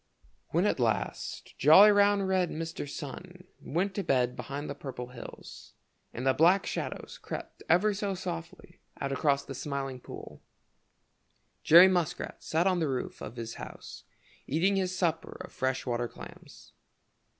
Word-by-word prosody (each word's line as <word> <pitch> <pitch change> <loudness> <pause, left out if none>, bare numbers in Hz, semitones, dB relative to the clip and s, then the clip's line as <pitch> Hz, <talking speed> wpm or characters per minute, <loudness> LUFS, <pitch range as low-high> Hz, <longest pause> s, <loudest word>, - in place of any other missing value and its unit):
When - - +2
at - - +1
last - - -2
jolly, 190 +9 +8
round, 205 -1 +4
red 185 -2 +2
Mr. 165 -2 -5
Sun 180 +7 -8 0.2
went 185 +6 -1
to 200 - -2
bed 125 -4 +1
behind 145 +2 -5
the - - -4
Purple 125 -3 -7
Hills, 125 -2 -11 0.4
and 125 - -5
the 135 - +4
black 175 +7 +4
shadows - - -5
crept - - -7
ever 210 +4 +4
so 200 -1 -2
softly 85 - -7 0.2
out 135 - -2
across 140 0 +1
the 135 - -7
Smiling 135 -1 -4
Pool, - - -10 1.2
Jerry 170 +4 +9
Muskrat 175 -4 -1
sat 165 +3 +1
on 185 -2 +2
the 160 -3 0
roof 130 -2 -4
of - - -7
his 115 -1 -5
house - - -9 0.4
eating 180 +7 +2
his 185 -1 -1
supper 165 -3 -1
of - - -10
fresh 130 0 -1
water 120 -1 -1
clams. - - -13
160 Hz, 150 wpm, -29 LUFS, 135-185 Hz, 1.2 s, Jerry